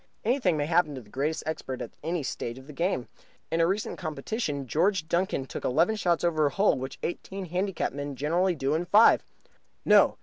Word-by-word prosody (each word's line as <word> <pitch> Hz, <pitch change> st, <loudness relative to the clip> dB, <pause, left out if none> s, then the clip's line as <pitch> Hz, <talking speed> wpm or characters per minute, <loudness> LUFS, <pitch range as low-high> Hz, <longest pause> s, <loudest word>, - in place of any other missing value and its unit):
Anything 225 Hz, -, +2 dB
may 145 Hz, -, 0 dB
happen 165 Hz, -2 st, +2 dB
to 130 Hz, -, -6 dB
the 105 Hz, -3 st, -19 dB
greatest 150 Hz, +4 st, -1 dB
expert 135 Hz, -5 st, -4 dB
at -, -, -6 dB
any 165 Hz, 0 st, -2 dB
stage 120 Hz, -2 st, -4 dB
of 130 Hz, -, -12 dB
the 150 Hz, -, -11 dB
game. 165 Hz, -5 st, -1 dB, 0.4 s
In 165 Hz, -, +2 dB
a 165 Hz, -, +4 dB
recent 195 Hz, +4 st, -2 dB
competition 155 Hz, -, -3 dB
George 165 Hz, -, +1 dB
Duncan 170 Hz, -5 st, 0 dB
took -, -, -7 dB
eleven 165 Hz, +11 st, +2 dB
shots 175 Hz, -5 st, +1 dB
over 155 Hz, -3 st, +2 dB
a -, -, +1 dB
hole 200 Hz, +7 st, +3 dB
which 130 Hz, +1 st, -5 dB
eighteen 190 Hz, +2 st, -4 dB
handicap 180 Hz, 0 st, -2 dB
men 145 Hz, 0 st, -5 dB
generally 170 Hz, +7 st, +1 dB
do 140 Hz, -1 st, 0 dB
in 165 Hz, +3 st, 0 dB
five. 210 Hz, +5 st, +6 dB, 0.6 s
No! -, -, +5 dB
160 Hz, 200 wpm, -28 LUFS, 140-185 Hz, 0.6 s, five